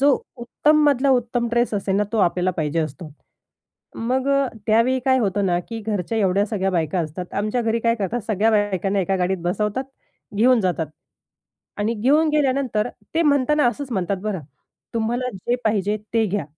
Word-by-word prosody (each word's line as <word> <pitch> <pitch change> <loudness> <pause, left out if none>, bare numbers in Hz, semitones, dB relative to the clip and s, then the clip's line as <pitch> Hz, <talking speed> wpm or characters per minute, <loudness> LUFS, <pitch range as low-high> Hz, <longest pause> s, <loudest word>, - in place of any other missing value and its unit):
जो 285 +1 +5 0.3
उत्तम 300 +5 +2
मधला 280 -1 +3
उत्तम 245 -1 +1
ड्रेस 240 -1 +1
असेल 195 -1 0
ना 210 - +2
तो 225 - 0
आपल्याला 180 0 +2
पाहिजे 155 +1 0
असतो. 155 +2 -5 0.9
मग 255 +3 -1
अ, 275 -1 +3 0.2
त्यावेळी 230 +4 +3
काय 260 -1 +4
होतं 205 -3 0
ना, 175 -1 +2
की 225 -1 -5
घरच्या 210 +1 -1
एवढ्या 195 0 +2
सगळ्या 195 -3 -1
बायका 170 -1 0
असतात 170 +3 -6
आमच्या 215 +4 -1
घरी 230 0 0
काय 230 0 +2
करतात 215 +4 -2
सगळ्या 215 +2 +2
बायकांना 200 -2 +1
एका 195 +1 0
गाडीत 185 +1 0
बसवतात, 210 +8 -1 0.5
घेऊन 245 +3 +4
जातात 180 -4 0 0.9
आणि 220 +3 0
घेऊन 285 +9 +3
गेल्यानंतर 265 -6 +1 0.3
ते 330 - +3
म्हणताना 295 -1 +3
असंच 265 +1 -5
म्हणतात 195 -1 -1
बरं. 210 -4 -2 0.5
"तुम्हाला 240 +3 -1
जे 240 +6 -1
पाहिजे 210 -1 +1 0.2
ते 225 -1 +3
घ्या. 205 -3 -2
220 Hz, 170 wpm, -22 LUFS, 190-250 Hz, 0.9 s, जो